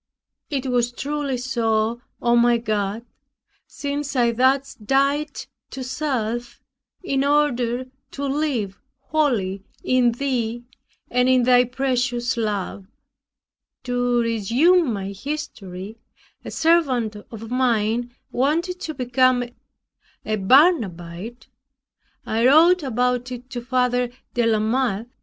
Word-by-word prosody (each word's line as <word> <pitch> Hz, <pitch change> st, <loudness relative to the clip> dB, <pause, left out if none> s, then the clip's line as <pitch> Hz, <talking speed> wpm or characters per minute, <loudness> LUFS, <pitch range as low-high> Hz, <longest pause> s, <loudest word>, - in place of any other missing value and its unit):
It 275 Hz, -3 st, -2 dB
was 245 Hz, -2 st, +1 dB
truly 285 Hz, 0 st, -3 dB
so, 230 Hz, -2 st, 0 dB, 0.2 s
O 240 Hz, 0 st, +4 dB
my 240 Hz, 0 st, +4 dB
God, 215 Hz, -1 st, -2 dB, 0.6 s
since 285 Hz, -1 st, -4 dB
I 240 Hz, -2 st, +3 dB
thus 265 Hz, +3 st, +2 dB
died 275 Hz, +6 st, 0 dB, 0.2 s
to 265 Hz, -, -6 dB
self, 245 Hz, -4 st, -3 dB, 0.4 s
in 275 Hz, -6 st, 0 dB
order 255 Hz, -4 st, +1 dB, 0.2 s
to 280 Hz, -, -5 dB
live 270 Hz, -9 st, -1 dB, 0.2 s
wholly 220 Hz, -11 st, 0 dB, 0.2 s
in 250 Hz, -2 st, +3 dB
Thee, 240 Hz, -3 st, -2 dB, 0.5 s
and 250 Hz, +1 st, +3 dB
in 255 Hz, -1 st, +4 dB
thy 250 Hz, 0 st, +5 dB
precious 250 Hz, -1 st, -1 dB
love. 205 Hz, -3 st, -3 dB, 1.0 s
To 245 Hz, -1 st, +1 dB
resume 240 Hz, -, +3 dB
my 195 Hz, -2 st, -3 dB
history, 200 Hz, -5 st, -6 dB, 0.4 s
a -, -, -7 dB
servant 275 Hz, -10 st, +2 dB
of 225 Hz, 0 st, -9 dB
mine 240 Hz, -1 st, +1 dB, 0.2 s
wanted 335 Hz, +8 st, 0 dB
to 315 Hz, -4 st, -5 dB
become 255 Hz, 0 st, +2 dB, 0.8 s
a 215 Hz, -, 0 dB
Barnabite. 210 Hz, -, +2 dB, 0.8 s
I 225 Hz, +3 st, +2 dB
wrote 335 Hz, +6 st, +6 dB
about 250 Hz, -1 st, 0 dB
it 250 Hz, +1 st, -8 dB
to 245 Hz, -2 st, -4 dB
Father 250 Hz, 0 st, +1 dB, 0.2 s
de 240 Hz, -2 st, +2 dB
la 220 Hz, -1 st, +3 dB
Mothe. 225 Hz, -1 st, 0 dB
245 Hz, 110 wpm, -22 LUFS, 230-270 Hz, 1.0 s, wrote